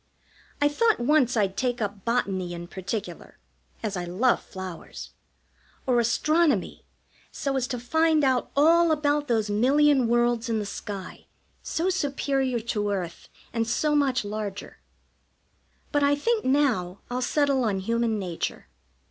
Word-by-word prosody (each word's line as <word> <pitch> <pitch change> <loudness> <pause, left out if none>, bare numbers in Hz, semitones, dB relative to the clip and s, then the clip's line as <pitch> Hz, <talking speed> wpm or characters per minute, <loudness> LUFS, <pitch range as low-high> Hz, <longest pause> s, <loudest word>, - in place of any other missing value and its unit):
I 290 - +4
thought 440 +10 +2
once 255 -1 +2
I'd 195 -3 +1
take 245 -1 -1
up 200 -2 -4
Botany 195 -7 -1
in 170 0 -7
particular, 200 +3 -6 0.5
as 210 -2 -2
I 180 - -3
love 190 +9 +1
flowers; 185 -3 -8 0.7
or 250 -2 +3
Astronomy, 305 +7 +1 0.4
so 275 -1 -2
as 255 -1 0
to 250 - -3
find 315 +5 +2
out 260 -2 +1
all 330 +3 +5
about 295 -1 +1
those 220 -3 0
million 270 +4 +4
worlds 240 0 +1
in 225 - +1
the 210 - -2
sky, 200 -1 -7 0.3
so 350 +4 -1
superior 275 -6 0
to 210 -2 -2
earth, 180 -4 -4 0.2
and 225 -1 0
so 300 +5 +1
much 265 -6 +1
larger; 205 -1 -6 1.1
but 290 - +2
I 285 0 +4
think, 440 +10 0
now, 245 -10 +1
I'll 250 +1 -1
settle 275 0 +1
on 210 -4 0
Human 230 +2 0
Nature. 175 - -4
240 Hz, 140 wpm, -26 LUFS, 205-285 Hz, 1.1 s, all